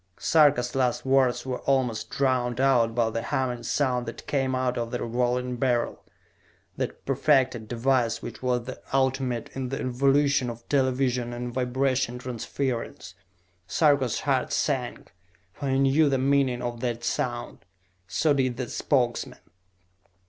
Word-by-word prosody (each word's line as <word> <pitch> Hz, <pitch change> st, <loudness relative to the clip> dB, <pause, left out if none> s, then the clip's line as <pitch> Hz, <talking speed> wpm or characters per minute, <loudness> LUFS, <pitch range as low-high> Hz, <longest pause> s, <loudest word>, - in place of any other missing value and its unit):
Sarka's 140 Hz, -6 st, +3 dB
last 130 Hz, -2 st, 0 dB
words 130 Hz, -2 st, +2 dB
were 130 Hz, -1 st, -3 dB
almost 120 Hz, -5 st, 0 dB
drowned 130 Hz, -3 st, 0 dB
out 120 Hz, -4 st, +3 dB
by 115 Hz, -2 st, +1 dB
the 115 Hz, -, -2 dB
humming 125 Hz, 0 st, -2 dB
sound 125 Hz, 0 st, 0 dB
that -, -, -7 dB
came 135 Hz, -2 st, 0 dB
out 130 Hz, -1 st, 0 dB
of 115 Hz, -1 st, -2 dB
the 125 Hz, -, -3 dB
Revolving 125 Hz, +1 st, -1 dB
Beryl, 120 Hz, -2 st, 0 dB, 0.7 s
that -, -, -4 dB
perfected 130 Hz, -6 st, +2 dB
device 120 Hz, 0 st, +1 dB
which -, -, -8 dB
was 125 Hz, -2 st, 0 dB
the 130 Hz, -, -8 dB
ultimate 130 Hz, -3 st, 0 dB
in 130 Hz, -1 st, -4 dB
the 135 Hz, -, -3 dB
evolution 135 Hz, +1 st, +2 dB
of 115 Hz, 0 st, -9 dB
television 130 Hz, -3 st, +1 dB
and 120 Hz, 0 st, -5 dB
vibration 130 Hz, 0 st, 0 dB
transference. 125 Hz, 0 st, -4 dB, 0.5 s
Sarka's 140 Hz, -6 st, +2 dB
heart -, -, 0 dB
sank, -, -, -2 dB, 0.4 s
for 140 Hz, +3 st, -4 dB
he 135 Hz, -, +2 dB
knew 140 Hz, +3 st, +4 dB
the 135 Hz, -, +2 dB
meaning 135 Hz, -2 st, +1 dB
of 120 Hz, -1 st, -4 dB
that 120 Hz, -1 st, -3 dB
sound. 120 Hz, -3 st, -2 dB, 0.5 s
So 145 Hz, -, +2 dB
did 130 Hz, -3 st, 0 dB
the 130 Hz, -1 st, -4 dB
Spokesmen. 125 Hz, -4 st, 0 dB
125 Hz, 140 wpm, -26 LUFS, 120-135 Hz, 0.7 s, knew